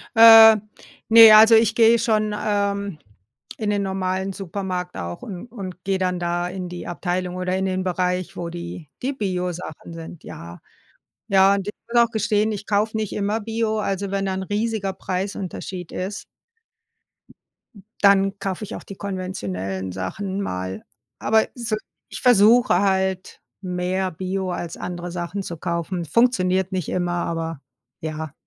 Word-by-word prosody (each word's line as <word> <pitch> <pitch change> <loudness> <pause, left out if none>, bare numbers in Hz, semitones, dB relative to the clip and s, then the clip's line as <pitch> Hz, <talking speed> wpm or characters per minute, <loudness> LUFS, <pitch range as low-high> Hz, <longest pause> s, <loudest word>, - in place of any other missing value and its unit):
Äh, 225 -1 +10 0.5
ne, 225 -1 +10
also 220 +1 +9
ich 225 -1 +4
gehe 230 0 +6
schon, 215 -2 +1
ähm, 200 -4 -1 0.6
in 215 -2 -2
den 205 -1 0
normalen 190 0 -2
Supermarkt 185 -1 -5
auch 85 -1 -6
und 190 +2 -7
und 185 -5 -8
gehe 195 -1 -1
dann 180 -1 -1
da 175 0 -1
in 185 -1 -6
die 175 0 -7
Abteilung 180 +1 -3
oder 185 0 -2
in 190 0 -1
den 185 0 -1
Bereich, 180 0 -1
wo 170 -1 -4
die 170 -3 -8
die 270 +3 -1
Bio-Sachen 180 - -4
sind, 165 0 -10
ja. 85 +1 -10 0.7
Ja, 195 0 +5
und 200 0 -4
ich 210 - -3 0.2
muss 240 0 +5
auch 235 - -2
gestehen, 215 0 +1
ich 205 -1 -5
kaufe 215 +1 +1
nicht 215 -2 -3
immer 205 +2 -1
Bio. 220 0 -1
Also 195 -1 -2
wenn 195 0 -1
da 190 - -1
'n 190 - -3
riesiger 205 -1 -2
Preisunterschied 185 -1 -5
ist 195 +2 -5 1.8
dann 195 0 +4
kaufe 195 +1 -4
ich - - -7
auch - - -8
die 195 - -10
konventionellen 95 - -4
Sachen 190 - -4
mal. 95 - -4 0.4
Aber 220 0 +2
so, 235 -3 -2 0.3
ich - - -7
versuche 240 -4 +5
halt 190 -1 -1 0.2
mehr 185 0 -2
Bio 185 +2 -3
als 175 -1 -5
andere 175 0 -6
Sachen 175 +3 -4
zu 170 -3 -6
kaufen. 170 +1 -3
Funktioniert 190 - +1
nicht 185 -4 -2
immer, 175 -1 -1
aber 165 -3 -3 0.4
ja. 155 -1 -5
190 Hz, 155 wpm, -22 LUFS, 175-210 Hz, 1.8 s, Äh